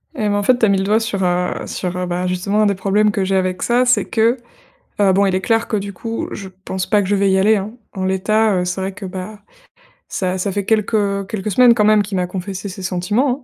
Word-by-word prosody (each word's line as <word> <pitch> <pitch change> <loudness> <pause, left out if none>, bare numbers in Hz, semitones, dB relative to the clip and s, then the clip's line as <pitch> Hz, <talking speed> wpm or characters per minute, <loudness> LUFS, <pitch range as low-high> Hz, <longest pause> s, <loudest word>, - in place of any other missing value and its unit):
Eh - - -8
ben, - - +1
en 205 - 0
fait, 250 +4 +4
tu 225 - +4
as - - +2
mis 200 - +3
le 190 - 0
doigt 210 +3 +2
sur, 225 -4 -2
heu 180 0 -1
sur, 180 -1 -4
heu, 180 - -2
bah, 180 +1 -2
justement, 195 +4 0
un - - +4
des 200 -1 +2
problèmes 205 +3 +2
que 195 -1 -1
j'ai 195 +1 0
avec 185 -1 0
ça, 245 +1 +2
c'est 250 +1 +3
que, 230 +2 +2 0.6
heu, 195 -2 +4
bon, 200 +2 +3
il 190 -1 +1
est 190 - 0
clair 225 +2 +1
que, 215 - -1
du 200 0 -5
coup, 230 +4 -4
je 195 -1 -7 0.2
pense 190 -1 -3
pas 210 -2 +3
que 195 - -3
je 205 - +2
vais 200 0 +2
y 190 - +3
aller, 210 +3 +4
hein. 200 +3 -5 0.2
En 190 -2 -3
l'état, 205 +3 +2
heu, 180 - -1
c'est 180 +1 -3
vrai 190 +1 -2
que, 205 0 -8
bah, 190 +3 -7 0.7
ça 185 0 -2
ça 195 +2 -1
fait 200 0 -3
quelques 205 -2 0
quelques 210 0 -3
semaines, 245 +4 +6
quand 210 -2 +2
même, 215 0 +5
qu'il 200 0 -4
m'a 180 - 0
confessé 190 +1 -5
ses 190 +1 -8
sentiments, 190 +9 0
200 Hz, 270 wpm, -18 LUFS, 185-215 Hz, 0.7 s, semaines